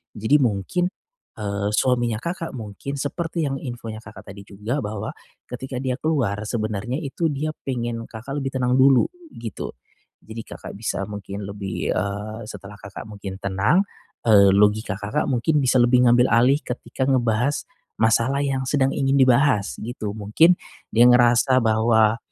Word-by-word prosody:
Jadi 110 Hz, +8 st, +3 dB
mungkin, 125 Hz, -, 0 dB, 0.5 s
eee, 100 Hz, -1 st, -2 dB
suaminya 120 Hz, -2 st, +1 dB
Kakak 170 Hz, -4 st, -4 dB
mungkin 110 Hz, +5 st, -6 dB
seperti 165 Hz, +4 st, -3 dB
yang 135 Hz, -1 st, -2 dB
infonya 115 Hz, -4 st, -6 dB
Kakak 100 Hz, -, -12 dB
tadi 100 Hz, 0 st, -12 dB
juga 105 Hz, +8 st, -3 dB
bahwa 105 Hz, -2 st, -4 dB, 0.3 s
ketika 130 Hz, +2 st, -7 dB
dia 130 Hz, 0 st, -2 dB
keluar 135 Hz, -11 st, 0 dB
sebenarnya 110 Hz, -, -3 dB
itu 150 Hz, +4 st, -1 dB
dia 155 Hz, +1 st, -2 dB, 0.2 s
pengen 120 Hz, -2 st, -3 dB
Kakak 130 Hz, +6 st, -6 dB
lebih 135 Hz, -1 st, -4 dB
tenang 125 Hz, 0 st, +2 dB
dulu 135 Hz, -1 st, +6 dB, 0.3 s
gitu, 115 Hz, -3 st, -6 dB, 0.5 s
jadi 110 Hz, +1 st, -7 dB
Kakak -, -, -9 dB
bisa 110 Hz, -3 st, -2 dB
mungkin 100 Hz, 0 st, -6 dB
lebih, 100 Hz, -1 st, -4 dB
eee, 105 Hz, +3 st, -3 dB
setelah 105 Hz, -1 st, -10 dB
Kakak 100 Hz, -, -9 dB
mungkin 100 Hz, -3 st, -8 dB
tenang, 100 Hz, -, +2 dB, 0.4 s
eee, 100 Hz, -3 st, +6 dB
logika 105 Hz, 0 st, +2 dB
Kakak 105 Hz, +9 st, -2 dB
mungkin 135 Hz, +4 st, +1 dB
bisa 130 Hz, -2 st, +2 dB
lebih 125 Hz, +1 st, +4 dB
ngambil 120 Hz, +1 st, +4 dB
alih 130 Hz, +6 st, +4 dB
ketika 125 Hz, +1 st, -4 dB
ngebahas 125 Hz, 0 st, +1 dB, 0.3 s
masalah 115 Hz, +5 st, +2 dB
yang 135 Hz, -1 st, -1 dB
sedang 135 Hz, -2 st, +2 dB
ingin 135 Hz, -1 st, +1 dB
dibahas 130 Hz, -5 st, +3 dB
gitu, 110 Hz, -3 st, -5 dB
mungkin 110 Hz, -, +4 dB, 0.4 s
dia 120 Hz, +2 st, +6 dB
ngerasa 125 Hz, +1 st, +5 dB
bahwa, 110 Hz, 0 st, +3 dB
120 Hz, 150 wpm, -23 LUFS, 105-135 Hz, 0.5 s, dulu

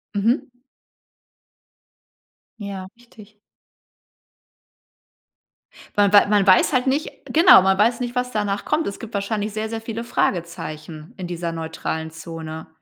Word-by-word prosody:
Mhm. 230 Hz, +6 st, 0 dB, 2.1 s
Ja, 195 Hz, -2 st, -6 dB
richtig. 215 Hz, -3 st, -18 dB, 2.6 s
Wa 205 Hz, -1 st, +4 dB
weil 205 Hz, -, +8 dB
ma -, -, -6 dB
man 200 Hz, -, +1 dB
weiß 185 Hz, +9 st, +5 dB
halt 255 Hz, +1 st, +1 dB
nicht 280 Hz, +4 st, 0 dB
genau, 340 Hz, -, +7 dB
man 190 Hz, 0 st, +2 dB
weiß 230 Hz, +4 st, +3 dB
nicht, 245 Hz, -1 st, -4 dB
was 250 Hz, 0 st, -1 dB
danach 205 Hz, -2 st, -2 dB
kommt. 305 Hz, +1 st, 0 dB
Es 200 Hz, -, -5 dB
gibt 230 Hz, 0 st, -9 dB
wahrscheinlich 205 Hz, +1 st, -2 dB
sehr, 215 Hz, +1 st, -3 dB
sehr 225 Hz, 0 st, -4 dB
viele 225 Hz, 0 st, -5 dB
Fragezeichen 165 Hz, -6 st, -3 dB
in 185 Hz, -, -5 dB
dieser 170 Hz, -1 st, -4 dB
neutralen 160 Hz, 0 st, -4 dB
Zone. 160 Hz, 0 st, -8 dB
200 Hz, 130 wpm, -22 LUFS, 170-230 Hz, 2.6 s, weil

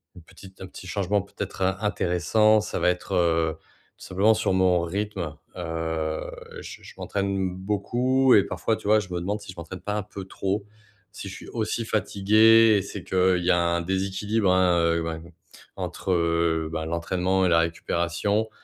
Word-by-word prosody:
une 90 Hz, -, -13 dB
petite 95 Hz, +2 st, -15 dB
un 95 Hz, -, -6 dB
petit 95 Hz, -, -11 dB
changement 100 Hz, +2 st, 0 dB
peut-être 100 Hz, 0 st, -7 dB
in 95 Hz, +1 st, +1 dB
intéressant, 105 Hz, +2 st, +2 dB
ça -, -, -4 dB
va -, -, +3 dB
être, 90 Hz, 0 st, -3 dB
heu, 80 Hz, -2 st, +1 dB, 0.4 s
tout -, -, -14 dB
simplement 100 Hz, +4 st, +3 dB
sur 110 Hz, -3 st, 0 dB
mon 90 Hz, -2 st, +3 dB
rythme, 95 Hz, -3 st, -3 dB, 0.2 s
heu, 80 Hz, -2 st, -3 dB, 0.3 s
je -, -, -10 dB
je -, -, -12 dB
m'entraîne 95 Hz, -2 st, -2 dB
beaucoup 120 Hz, +7 st, +1 dB
et 100 Hz, -, +6 dB
parfois 110 Hz, -, -1 dB
tu -, -, -9 dB
vois, 110 Hz, +1 st, +5 dB
je 100 Hz, -3 st, -7 dB
me 90 Hz, -, -1 dB
demande 105 Hz, +4 st, -3 dB
si 100 Hz, -, -9 dB
je 90 Hz, -, -16 dB
m'entraîne 85 Hz, +2 st, -8 dB
pas 105 Hz, +3 st, -3 dB
un 105 Hz, -, -2 dB
peu 100 Hz, -1 st, -9 dB
trop. 100 Hz, +2 st, -3 dB, 0.5 s
Si 100 Hz, -, -6 dB
je -, -, -8 dB
suis -, -, -11 dB
aussi 115 Hz, 0 st, -2 dB
fatigué, 110 Hz, +1 st, +4 dB
c'est 100 Hz, -1 st, -7 dB
qu'il 90 Hz, -1 st, +2 dB
y -, -, +1 dB
a -, -, +4 dB
un 85 Hz, 0 st, +1 dB
déséquilibre, 95 Hz, +3 st, 0 dB
hein, 90 Hz, -1 st, +3 dB
heu, 85 Hz, 0 st, +2 dB
bah, 80 Hz, 0 st, -3 dB, 0.6 s
entre, 95 Hz, -, -4 dB
heu, 85 Hz, -2 st, +1 dB
bah, 80 Hz, -1 st, -3 dB
l'entraînement 90 Hz, +3 st, 0 dB
et -, -, +3 dB
la 85 Hz, -1 st, +4 dB
récupération 85 Hz, +5 st, -1 dB
95 Hz, 185 wpm, -25 LUFS, 85-105 Hz, 0.6 s, et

